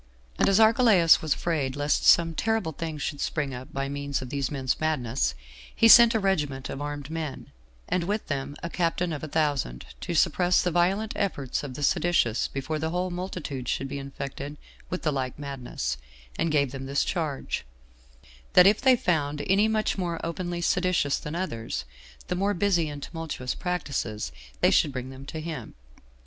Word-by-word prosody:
And -, -, +4 dB
as 195 Hz, +2 st, +4 dB
Archelaus 220 Hz, -8 st, +6 dB
was 155 Hz, -3 st, +1 dB
afraid 145 Hz, -6 st, -1 dB
lest 145 Hz, +1 st, +1 dB
some 165 Hz, -1 st, +6 dB
terrible 220 Hz, -2 st, 0 dB
thing 160 Hz, 0 st, -5 dB
should 145 Hz, 0 st, -4 dB
spring 145 Hz, -4 st, -1 dB
up 125 Hz, +1 st, -8 dB
by 135 Hz, 0 st, -2 dB
means 140 Hz, 0 st, -2 dB
of 130 Hz, -1 st, -7 dB
these 140 Hz, -2 st, -1 dB
men's 130 Hz, -3 st, -1 dB
madness, 125 Hz, -, 0 dB, 0.4 s
he 230 Hz, -, +5 dB
sent 235 Hz, 0 st, +9 dB
a -, -, +3 dB
regiment 150 Hz, -9 st, -1 dB
of 135 Hz, -, -5 dB
armed 145 Hz, 0 st, -5 dB
men, 155 Hz, -, -5 dB, 0.4 s
and 180 Hz, -2 st, 0 dB
with 210 Hz, +3 st, -1 dB
them 140 Hz, 0 st, -3 dB
a 170 Hz, -, -3 dB
captain 170 Hz, 0 st, 0 dB
of 150 Hz, -, -5 dB
a -, -, -3 dB
thousand, 145 Hz, -, -1 dB, 0.2 s
to -, -, -3 dB
suppress 180 Hz, 0 st, +3 dB
the 180 Hz, -, 0 dB
violent 190 Hz, +6 st, +1 dB
efforts 145 Hz, -10 st, -1 dB
of 135 Hz, -3 st, -7 dB
the 145 Hz, -, -5 dB
seditious 145 Hz, -7 st, +2 dB
before 145 Hz, +3 st, -3 dB
the 160 Hz, +1 st, -1 dB
whole 180 Hz, +2 st, -1 dB
multitude 175 Hz, -8 st, -5 dB
should 135 Hz, -, -1 dB
be 140 Hz, +1 st, -5 dB
infected 140 Hz, +1 st, -6 dB, 0.3 s
with 180 Hz, -, -4 dB
the 155 Hz, -, +2 dB
like 130 Hz, -3 st, -3 dB
madness; 125 Hz, -, -4 dB, 0.4 s
and 165 Hz, -, 0 dB
gave 140 Hz, -4 st, +2 dB
them 135 Hz, 0 st, -6 dB
this 140 Hz, +1 st, +1 dB
charge, 155 Hz, -7 st, -2 dB, 0.9 s
that 180 Hz, -, +8 dB
if 205 Hz, +2 st, +5 dB
they 260 Hz, -1 st, +6 dB
found 150 Hz, -8 st, 0 dB
any 200 Hz, +3 st, +4 dB
much 215 Hz, -2 st, 0 dB
more 170 Hz, -2 st, -2 dB
openly 175 Hz, +1 st, -3 dB
seditious 180 Hz, -5 st, +1 dB
than 150 Hz, +2 st, -6 dB
others, 115 Hz, -, -3 dB, 0.4 s
and 180 Hz, -, -2 dB
more 200 Hz, +1 st, +1 dB
busy 175 Hz, -4 st, +2 dB
in 145 Hz, -1 st, -7 dB
tumultuous 160 Hz, -6 st, -4 dB
practices, 140 Hz, -, -3 dB, 0.3 s
they -, -, +5 dB
should 145 Hz, -, +3 dB
bring 130 Hz, 0 st, -5 dB
them 135 Hz, +1 st, -11 dB
to 160 Hz, -, -5 dB
him. 155 Hz, -7 st, -6 dB
155 Hz, 185 wpm, -27 LUFS, 135-180 Hz, 0.9 s, sent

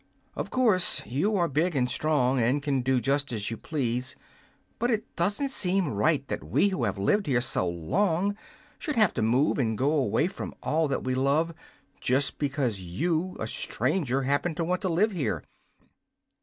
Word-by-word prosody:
Of -, -, -4 dB
course 220 Hz, -8 st, +2 dB
you 160 Hz, -, 0 dB
are 175 Hz, -3 st, +2 dB
big 160 Hz, +4 st, 0 dB
and 125 Hz, -2 st, +2 dB
strong 135 Hz, -2 st, +1 dB
and 125 Hz, +5 st, +1 dB
can 140 Hz, -3 st, 0 dB
do 130 Hz, 0 st, +2 dB
just 140 Hz, +2 st, 0 dB
as 110 Hz, -2 st, -2 dB
you -, -, -2 dB
please, 125 Hz, -3 st, -2 dB, 0.6 s
but 240 Hz, +2 st, +1 dB
it 220 Hz, -3 st, -2 dB
doesn't 205 Hz, +11 st, 0 dB
seem 185 Hz, -, +2 dB
right 140 Hz, +6 st, +1 dB
that -, -, -4 dB
we 205 Hz, -, +2 dB
who 155 Hz, -11 st, -1 dB
have 100 Hz, -1 st, -2 dB
lived 175 Hz, -, +1 dB
here 125 Hz, -3 st, +3 dB
so 95 Hz, -7 st, 0 dB
long 175 Hz, -, 0 dB, 0.4 s
should 300 Hz, -, -3 dB
have 215 Hz, -5 st, +4 dB
to 120 Hz, -, -2 dB
move 125 Hz, +7 st, +2 dB
and 110 Hz, -4 st, 0 dB
go 140 Hz, +3 st, +2 dB
away 140 Hz, -2 st, +2 dB
from 190 Hz, -, -5 dB
all 160 Hz, 0 st, +1 dB
that 135 Hz, -, -2 dB
we 130 Hz, -, -1 dB
love 140 Hz, +5 st, +2 dB
so 165 Hz, -, -11 dB, 0.4 s
just 135 Hz, +3 st, +1 dB
because 135 Hz, -7 st, -1 dB
you, 160 Hz, -, -2 dB
a -, -, -2 dB
stranger, 135 Hz, -7 st, -1 dB
happen 145 Hz, +5 st, 0 dB
to 170 Hz, -, -1 dB
want 180 Hz, +2 st, -1 dB
to 190 Hz, -, -1 dB
live 195 Hz, +6 st, +2 dB
here. 170 Hz, -8 st, -2 dB
145 Hz, 185 wpm, -27 LUFS, 125-180 Hz, 0.6 s, have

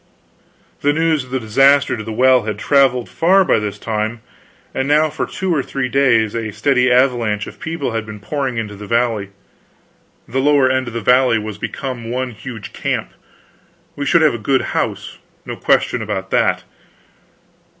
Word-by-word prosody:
The 145 Hz, +1 st, +2 dB
news 160 Hz, -3 st, +1 dB
of -, -, -17 dB
the 130 Hz, +1 st, -2 dB
disaster 135 Hz, +5 st, +3 dB
to 110 Hz, -, -6 dB
the 110 Hz, -, -6 dB
well 130 Hz, +3 st, +4 dB
had 105 Hz, -1 st, -4 dB
traveled 130 Hz, 0 st, +2 dB
far 190 Hz, +3 st, +3 dB
by -, -, +3 dB
this 105 Hz, -2 st, -4 dB
time; 110 Hz, +1 st, -3 dB, 0.5 s
and 130 Hz, -, -2 dB
now 150 Hz, +1 st, +3 dB
for -, -, -3 dB
two 190 Hz, -2 st, -2 dB
or 150 Hz, -, +1 dB
three 135 Hz, -1 st, -3 dB
days 120 Hz, -5 st, +2 dB
a 115 Hz, -2 st, -3 dB
steady 125 Hz, +2 st, +1 dB
avalanche 120 Hz, -5 st, +2 dB
of -, -, -11 dB
people 160 Hz, -6 st, -3 dB
had 110 Hz, -1 st, -3 dB
been 105 Hz, -1 st, -8 dB
pouring 135 Hz, +2 st, -3 dB
into 105 Hz, -2 st, -4 dB
the 105 Hz, +1 st, -10 dB
valley. 115 Hz, -3 st, 0 dB, 1.0 s
The 130 Hz, +3 st, -2 dB
lower 140 Hz, -2 st, +3 dB
end 130 Hz, -1 st, 0 dB
of 120 Hz, -, -7 dB
the 115 Hz, -, -2 dB
valley 125 Hz, 0 st, +4 dB
was 105 Hz, -1 st, -6 dB
become 120 Hz, -2 st, -5 dB
one 125 Hz, +1 st, -2 dB
huge 110 Hz, -1 st, -9 dB
camp; -, -, -3 dB, 0.8 s
we 145 Hz, 0 st, -4 dB
should 165 Hz, +2 st, +4 dB
have 150 Hz, -, +4 dB
a 115 Hz, -, -4 dB
good 130 Hz, +4 st, +1 dB
house, -, -, -3 dB, 0.3 s
no -, -, -5 dB
question 120 Hz, -, +1 dB
about 95 Hz, -3 st, -4 dB
that. -, -, +1 dB
125 Hz, 180 wpm, -18 LUFS, 110-140 Hz, 1.0 s, well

